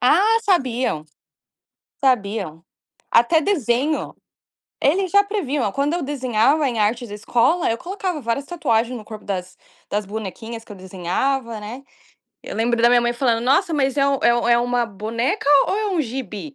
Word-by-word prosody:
Ah 400 - +4
sabiam, 255 - 0 1.0
sabiam, 200 - 0 0.5
até 315 +8 +4
desenho, 295 - 0 0.7
eles 370 +5 +2
já 405 0 +6
previam, 295 - -1
quando 280 +3 0
eu 355 - -2
desenhava 270 +1 +1
em 235 -3 -3
artes 225 +2 0
escola, 235 +10 +1
eu 230 - -2
colocava 365 -3 -4
várias 235 +4 -2
tatuagens 245 -8 0
no 215 - -9
corpo 215 -1 -10
das 185 -2 -5 0.3
das 205 0 -1
bonequinhas 220 +3 -6
que - - -13
eu - - -8
desenhava, 210 +7 -2
né. 230 +6 -8 0.6
Eu - - -7
lembro 230 +1 +1
da 235 - +6
minha 245 0 +5
mãe 240 0 0
falando 235 -2 +1
nossa 325 +7 +2
mas 270 -2 +1
é 275 - +4
o 275 -1 +1
é 240 0 +4
é 235 - +4
um 245 - -2 0.3
boneca 230 - -2 0.2
ou - - 0
é 430 - -1
um 360 -5 +1
gibi? 255 0 -6
245 Hz, 165 wpm, -21 LUFS, 225-295 Hz, 1.0 s, já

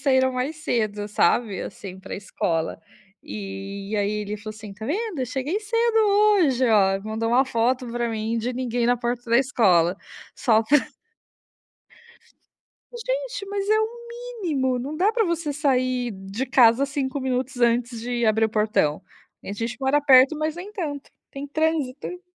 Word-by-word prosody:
saíram 260 -2 +3
mais 260 +5 -2
cedo, 215 -9 -1
sabe, 210 0 +1
assim, 190 -2 -8
pra 190 - -7
escola. 165 -5 -2 0.4
E 195 0 -6
aí, 205 0 +1
ele 210 +1 -4
falou 215 +1 -8
assim: 215 -2 -10
"Tá 220 +3 -8
vendo? 400 - -2
Eu 255 - -1
cheguei 275 - -2
cedo 460 +1 +1
hoje, 400 - +4
ó". 195 -3 +4
Mandou 220 +1 -2
uma 250 +3 +4
foto 250 +1 0
pra 240 0 -1
mim 225 +1 -2
de 245 +3 -2
ninguém 245 -1 -1
na 245 - +3
porta 240 0 -3
da 235 - +6
escola, 190 - +3 0.4
só 225 -3 +3
pra 290 +7 +4 2.2
Gente, - - -3
mas 400 0 -2
é 435 0 +4
o 440 - +1 0.5
mínimo. 260 -7 0
Não 275 +5 -5
dá 380 +7 +3
pra 455 -2 +2
você 335 -3 -1
sair 255 -4 0
de 195 +5 -5
casa 250 0 +5
5 275 -1 -3
minutos 260 0 -2
antes 235 0 +1
de 240 0 -1
abrir 220 +1 +3
o - - +2
portão. 210 -8 +1 0.4
A 200 - -6
gente 230 +2 -4
mora 265 +2 +3
perto, 270 +1 +6
mas 310 +1 -2
nem 365 +4 -7
tanto, 295 -9 -5 0.2
tem 275 +1 -6
trânsito. 315 +2 -2
250 Hz, 160 wpm, -24 LUFS, 220-295 Hz, 2.2 s, da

